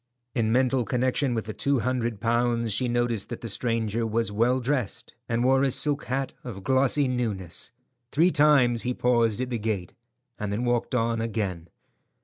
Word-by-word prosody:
In 115 -4 +1
mental 130 +1 +2
connection 125 +3 0
with 110 - -2
the 110 - -5
two 140 +1 +1
hundred 120 -3 -1
pounds, 115 0 +1
she 125 +5 +1
noticed 120 -3 -1
that 120 - -6
the 115 - -5
stranger 115 0 -1
was 115 -1 -1
well 120 +5 +2
dressed, 130 -4 -2 0.2
and 115 +1 +1
wore 130 +1 +4
a 135 - +3
silk 145 +3 0
hat 135 +2 -2
of 100 -6 -7
glossy 135 +3 +3
newness. 110 -8 -3 0.4
Three 170 +5 +4
times 140 -7 +4
he 125 0 -1
paused 120 -2 +2
at 130 0 -3
the 120 - -1
gate, 105 -5 -3 0.5
and 105 -2 -3
then 110 +5 -1
walked 120 +1 0
on 115 -1 0
again. 100 -7 -3
120 Hz, 175 wpm, -26 LUFS, 110-130 Hz, 0.5 s, wore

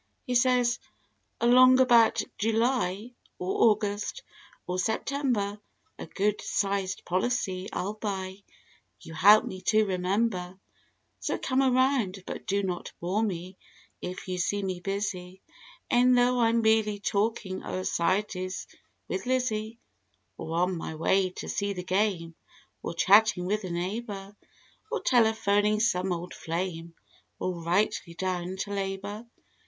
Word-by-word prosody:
He 250 - -2
says 245 -1 +3 0.6
"Along 255 +2 +6
about 240 -3 +5 0.2
July, 225 -1 0 0.3
or 190 +5 +3
August 210 - -2 0.4
or 180 +1 -2
September 220 -1 -1 0.4
A - - -7
good 205 +1 -1
sized 195 -1 -1
policy 190 -1 -1
I'll 200 +3 -3
buy, 195 -3 -4 0.6
you 165 - -10
help 205 +7 +6
me 185 0 -7
to 215 0 +4
remem¬ 190 +4 +1
ber. 180 -1 -7 0.6
So - - -2
come 260 0 0
around 255 -7 +2
but - - -7
do 200 +1 +1
not 180 -2 -4
bore 185 +5 -1
me 185 -3 -4 0.4
if 185 +1 -6
you 180 -1 -3
see 205 +3 0
me 185 -2 -3
busy. 190 -1 -4 0.5
E'en 250 +1 +5
though 245 0 +3
I'm 230 0 +3
merely 220 -1 +3
talking 200 -1 -1
o'er 185 - -4
"Society's" 185 +1 -1 0.4
with 380 - -4
Lizzie; 230 -3 -1 0.6
Or 165 +1 -2
on 180 +1 +1
my 160 -1 -5
way 185 +4 +2
to 180 - -8
see 200 0 -1
the 180 -2 -6
game; 185 -3 0 0.5
or 165 - -5
chatting 200 0 +5
with 210 +3 -1
a - - -5
neighbor; 195 +3 -4 0.6
Or 465 - 0
telephoning 215 -3 +3
some 190 -5 +1
"old 175 +1 -4
flame;" 165 0 -4 0.4
or 180 -2 -3
rightly 170 -1 0
down 185 0 -3
to 205 - -4
labor. 200 +3 -4
200 Hz, 135 wpm, -28 LUFS, 185-225 Hz, 0.6 s, Along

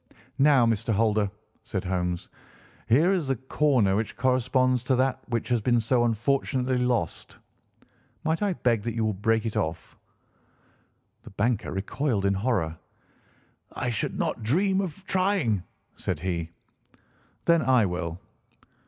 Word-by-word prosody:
"Now, 135 -3 +5
Mr. 115 0 0
Holder," 105 -1 +2 0.3
said 95 - -4
Holmes, 90 -1 -2 0.6
"here 155 +11 +4
is 175 -7 -1
the 135 - +1
corner 130 -5 +2
which 110 +1 -2
corresponds 130 0 +2
to 130 - +2
that 130 +1 +1
which 120 -2 -1
has 120 -2 +2
been 120 +2 +2
so 120 +2 +2
unfortunately 125 +2 0
lost. 120 -10 -2 0.9
Might 160 +3 0
I 205 -2 +1
beg 120 -9 +1
that 115 +2 -4
you 115 -1 0
will 110 - 0
break 110 +3 0
it 110 - -3
off." 80 +1 -3 1.3
The - - -12
banker 105 +3 -1
recoiled 100 +3 -1
in 100 - +3
horror. 95 -7 -1 0.9
"I 120 - -2
should 110 - -2
not - - -2
dream 190 - +2
of 190 +1 -6
trying," 185 - +1 0.3
said - - -3
he. 85 -3 -2 1.0
"Then 170 -1 +4
I 125 -4 +4
will." 90 -2 -3
120 Hz, 140 wpm, -26 LUFS, 100-135 Hz, 1.3 s, Now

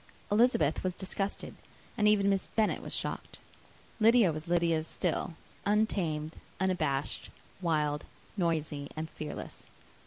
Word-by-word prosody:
Elizabeth 215 - +4
was 185 -1 -1
disgusted, 195 +1 -3 0.4
and 210 -3 +3
even 205 -2 +5
Miss 195 -1 +2
Bennet 220 -2 +2
was - - -6
shocked. - - -3 0.6
Lydia 225 -4 +6
was 155 +2 -6
Lydia 170 -2 +2
still; 165 +1 -1 0.3
untamed, 175 -7 +1 0.2
unabashed, 175 -7 0 0.3
wild, 150 -4 +1 0.3
noisy, 155 -6 -1
and 155 0 -4
fearless. 150 -1 -6
175 Hz, 115 wpm, -31 LUFS, 155-205 Hz, 0.6 s, Lydia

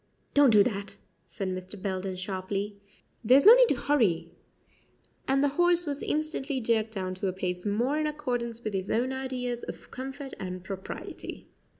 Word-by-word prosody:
"Don't 285 -2 +6
do 210 -3 +7
that," 200 -3 -3 0.3
said 195 -2 -4
Mr. 185 +2 -6
Belden 190 -1 -3
sharply; 195 +2 -3 0.5
"there's 255 +7 +6
no 440 - +12
need - - +6
to - - +3
hurry 240 - +1 1.0
and 270 +1 +3
the 285 - +4
horse 350 +4 +3
was 285 -2 -3
instantly 300 -3 -1
jerked 225 -2 0
down 185 -2 -3
to 185 +1 -3
a 185 - -1
pace 180 +1 -3
more 240 +9 +1
in 305 - +1
accordance 245 -6 -3
with 215 - -3
his 190 0 -2
own 250 +4 +1
ideas 250 -2 -3
of - - -9
comfort 270 +1 -6
and 185 -1 -5
propriety. 190 0 -7
235 Hz, 170 wpm, -28 LUFS, 190-275 Hz, 1.0 s, no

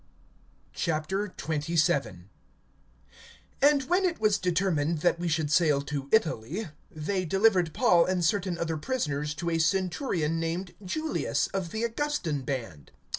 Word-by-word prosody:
XXVII. 155 - -1 1.3
AND 285 0 +5
when 355 +8 +1
it 355 -3 0
was 215 -2 +2
determined 170 -4 0
that 175 0 +2
we 175 - -2
should 155 -2 0
sail 150 -4 +4
to 140 -1 -5
Italy, 170 - 0 0.2
they 185 +5 -2
delivered 190 -1 +3
Paul 175 -5 +4
and 180 -2 0
certain 185 -1 0
other 165 -1 -2
prisoners 150 - -2
to 170 +2 -3
a 165 - +1
centurion 175 - 0
named 170 +2 -3
Julius, 310 - -1
of 190 -3 -2
the 220 +6 -3
Augustan 230 - -1
band. 115 - -5
170 Hz, 125 wpm, -28 LUFS, 150-195 Hz, 1.3 s, AND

